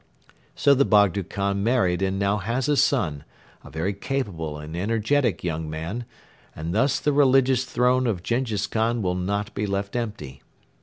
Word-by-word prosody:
So 140 - +4
the 140 0 +4
Bogdo 100 -5 +3
Khan 100 +2 -2
married 100 -7 +1
and 95 0 0
now 100 +1 +1
has 115 +7 -2
a 150 - +3
son, 85 - +1 0.4
a - - -12
very 85 +6 -2
capable 95 - -3
and 75 +2 -8
energetic 115 - 0
young 80 -2 -3
man, 85 +10 -5 0.5
and 80 +2 -4
thus 130 +6 +2
the 150 - 0
religious 135 -2 +4
throne 125 +1 +2
of 95 -7 -2
Jenghiz 115 -4 -1
Khan 115 +2 0
will 90 -1 0
not 100 +4 -2
be 105 0 -2
left 100 +2 -3
empty. 100 - -5
105 Hz, 165 wpm, -24 LUFS, 90-125 Hz, 0.5 s, So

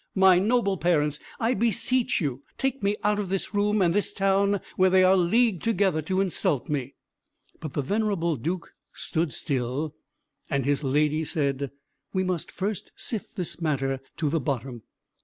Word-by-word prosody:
My 190 -2 +6
noble 200 -1 +2
parents, 150 -4 +1 0.2
I 230 +2 +2
beseech 235 +3 +1
you 140 -6 -2 0.2
take 270 0 -1
me 200 +1 +1
out 210 0 +2
of 200 -3 -3
this 195 +2 -2
room, 205 0 +2
and 170 -1 +3
this 205 +1 +1
town, 195 +1 +2 0.2
where 185 0 +4
they 185 0 +5
are 185 +1 +6
leagued 190 +2 +3
together 195 -8 +1
to 185 +5 0
insult 160 -7 0
me." 140 -3 -2 0.6
But 155 -4 -6
the 145 - -1
venerable 195 -2 0
Duke 165 +7 -4 0.2
stood 160 -3 -2
still, 140 +2 -2 0.6
and 140 -4 0
his 145 +1 +1
lady 150 +3 +2
said, 140 -4 -1 0.4
"We 190 -1 +1
must 180 -3 -2
first 200 0 -4
sift 225 -1 -3
this 180 -3 -4
matter 135 -4 0 0.2
to 155 - 0
the 160 +3 +1
bottom. 130 -3 -3
180 Hz, 165 wpm, -26 LUFS, 145-200 Hz, 0.6 s, My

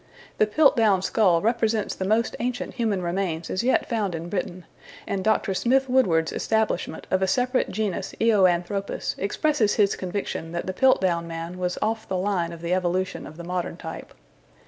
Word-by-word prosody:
The 215 - +4
Piltdown 220 -7 +4
skull 185 -4 +3
represents 225 -1 +1
the 190 - -4
most 220 +4 +1
ancient 245 +1 -3
human 215 -7 -1
remains 170 -2 -2
as 185 - -1
yet 260 - +2
found 210 -7 -1
in 165 +1 -6
Britain, 180 -1 -4 0.4
and 195 -1 -2
Dr. 215 -1 +1
Smith 265 +7 +2
Woodward's 180 -12 +2
establishment 220 -1 -1
of 185 - +2
a 190 - +2
separate 250 +5 +1
genus 195 -2 -3
Eoanthropus 195 -3 +1
expresses 220 +2 +1
his 200 -2 +3
conviction 180 -3 -4
that 170 - -3
the 185 - -3
Piltdown 185 -8 +2
man 165 +2 -6
was 180 0 -2
off 220 0 -2
the 190 - 0
line 180 -3 -1
of 170 -1 -9
the 170 +1 -1
evolution 185 0 -1
of 155 - -12
the 170 - -7
modern 180 -1 -3
type. 160 -1 -8
190 Hz, 170 wpm, -25 LUFS, 175-220 Hz, 0.4 s, The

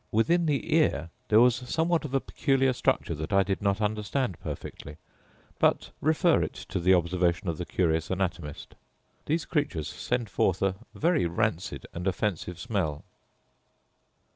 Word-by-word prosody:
Within 165 +10 +3
the 145 -1 0
ear 85 - +2 0.2
there 110 - +6
was 120 0 +6
somewhat 160 +6 0
of 140 -2 -3
a - - +4
peculiar 135 -1 +1
structure 105 - 0
that 80 +3 -5
I 100 -1 +5
did 95 +1 -2
not 100 0 +1
understand 105 - -1
perfectly; 75 +1 -7 0.6
but - - +2
refer 160 +2 +3
it - - -2 0.2
to - - -2
the 90 +2 +5
observation 90 +2 +1
of 80 - -3
the 90 - -4
curious 80 -3 0
anatomist. 90 -5 -3 0.5
These 160 +2 0
creatures 145 - -1
send 120 -2 -2
forth 95 -1 +1
a 95 -1 +2 0.2
vary 160 - +2
rancid 85 - -2
and 90 +3 -4
offensive 90 -3 -2
smell. 95 - -2
100 Hz, 150 wpm, -28 LUFS, 85-135 Hz, 0.6 s, there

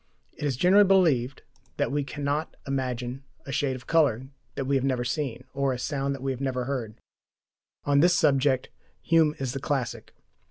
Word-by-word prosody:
It 150 - -5
is 135 -4 -1
generally 190 +7 +6
believed 160 -10 +2 0.3
that - - 0
we 145 0 0
cannot 145 +2 -3
imagine 130 -1 -3 0.2
a 140 - -6
shade 135 -1 0
of 130 0 -10
colour 135 -6 +2 0.3
that 135 - -3
we 140 +1 +1
have 135 - +1
never 130 -2 0
seen, 130 -1 -3
or 140 -1 0
a - - -4
sound 140 +1 -2
that 135 - -9
we 135 - 0
have 130 0 -5
never 130 -2 -1
heard. 120 -5 -4 0.9
On 140 -1 +3
this 175 +3 +5
subject 135 -1 +2 0.3
Hume 160 -2 +3
is 130 -2 -3
the 135 - -3
classic. 125 -5 -3
135 Hz, 185 wpm, -26 LUFS, 130-145 Hz, 0.9 s, generally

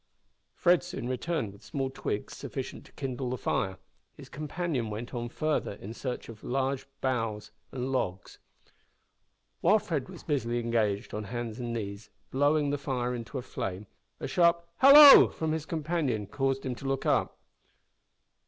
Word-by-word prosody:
Fred 175 0 +4
soon 175 -8 -5
returned 130 - -2
with 100 - -17
small 135 -2 -3
twigs 105 -5 -4
sufficient - - -6
to - - -20
kindle 130 -2 -4
the 125 - -2
fire; 95 -4 -1 0.4
his - - -12
companion 150 -4 -3
went 110 +4 -6
on 120 -1 -3
further 155 -3 -1
in 100 +2 -9
search 125 +1 -5
of 110 -3 -11
larger 135 +1 -1
boughs 115 -5 -2 0.2
and 130 0 -3
logs. 95 -8 -3 1.2
While 215 - +5
Fred 150 -10 -3
was - - -11
busily 120 -6 -1
engaged 115 -4 0
on 105 0 -4
hands 120 +1 -5
and 120 -1 -3
knees, 105 -2 -5 0.2
blowing 145 +1 +2
the 145 - -1
fire 125 -3 -2
into 120 +3 -5
a 125 - -4
flame, 95 -1 -5 0.3
a - - -4
sharp 170 -1 +3
"hallo!" 280 +1 +10
from 160 -1 -3
his 160 -1 -3
companion 155 -9 -1
caused 135 +5 -1
him 130 - -1
to 130 +3 -7
look 135 0 -1
up. - - +1
130 Hz, 160 wpm, -29 LUFS, 115-145 Hz, 1.2 s, hallo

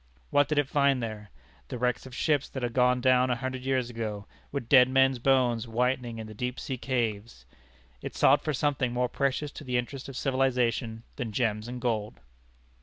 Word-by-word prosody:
What 145 -1 +4
did 150 - -1
it 145 -2 +3
find 140 -2 +2
there? 105 -2 -6 0.4
The - - -5
wrecks 125 +2 -1
of 130 - -10
ships 145 -2 +1
that 130 - -6
had 120 -1 -2
gone 125 0 +3
down 130 0 +4
a 125 - +2
hundred 130 +1 -4
years 130 -2 0
ago, 110 -3 -4 0.3
with 140 -5 -4
dead 125 -1 +7
men's 135 -1 +3
bones 125 -3 +2
whitening 120 0 -1
in 110 - -6
the 110 - -9
deep 125 +4 -4
sea 130 -3 -4
caves? 115 - -3 0.6
It - - -6
sought - - +4
for 155 - -1
something 135 -3 0
more 125 0 0
precious 140 +3 -1
to 155 - -10
the 125 -2 -1
interest 125 +3 -4
of 135 - -7
civilization 125 -4 0
than 120 -5 -3
gems 105 -1 -1
and 125 +1 -6
gold. 110 -4 -2
125 Hz, 195 wpm, -28 LUFS, 115-135 Hz, 0.6 s, dead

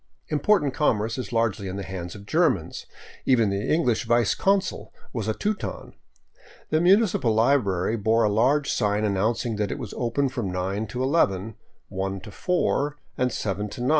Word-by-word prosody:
Important 150 -1 +2
commerce 115 -5 0
is 125 - -5
largely 115 -4 0
in 95 - -5
the 100 - -4
hands 90 -2 -6
of 100 -1 -11
Germans; 155 - 0 0.4
even 115 -6 +3
the 100 +1 -1
English 125 -9 +1
vice 120 -2 +3
consul 195 -1 0 0.2
was 115 -5 -3
a 110 - 0
Teuton. 210 0 -3 0.8
The 155 - +3
munici 195 +4 +4
pal 115 -3 +2
library 110 -4 +2
bore 110 +2 +2
a - - +4
large 130 +8 +2
sign 105 -1 +1
announcing 110 +3 0
that 105 -2 -1
it - - -3
was - - -7
open 125 +4 0
from 120 -8 -3
9 95 +4 -2
to 125 +5 -3
11, 110 - +1 0.4
I 95 0 -2
to 95 +3 -10
4, 150 - 0 0.2
and 125 0 0
7 105 -1 -3
to 120 - -8
9. 125 - 0
115 Hz, 175 wpm, -25 LUFS, 100-140 Hz, 0.8 s, munici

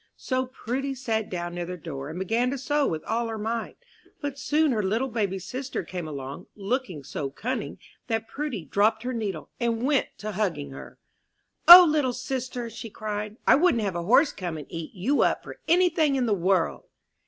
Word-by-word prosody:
So 255 -1 -1
Prudy 265 +2 -3
sat 225 -4 -2
down 175 -1 -4
near 175 -1 -4
the 180 0 -5
door, 145 -4 -6
and 160 - -6
began 225 +7 +1
to 275 - -2
sew 290 +2 +1
with 155 -1 -3
all 235 +1 -1
her 225 -1 -4
might; 225 +2 -3 0.4
but 285 -2 -4
soon 305 0 +2
her 220 -3 +1
little 220 +7 0
baby 205 -5 -1
sister 255 +6 -4
came 175 -1 -6
along, 140 +3 -7
looking 200 - -3
so 135 +1 -4
cunning, 250 - -4 0.3
that 225 -2 -1
Prudy 255 - -4
dropped 220 +2 +2
her 255 +1 -2
needle, 200 -9 -4
and 235 -1 0
went 275 0 +2
to 215 0 -5
hugging 185 - -2
her. 65 -2 -10 0.7
"O, 355 +1 +13
little 295 -5 +1
sister," 250 -1 -4 0.2
cried 210 0 -4
she, - - -22
"I - - +7
wouldn't 285 -6 +3
have 195 -4 -2
a 170 - -1
horse 255 - +4
come 175 -4 -5
and 150 - -7
eat 165 +4 -6
you 240 +11 +1
up - - +2
for - - -10
any 360 +2 +5
thing 315 -4 +2
in 260 -2 +1
the 220 - +2
world!" 185 -2 +1
225 Hz, 200 wpm, -26 LUFS, 180-260 Hz, 0.7 s, O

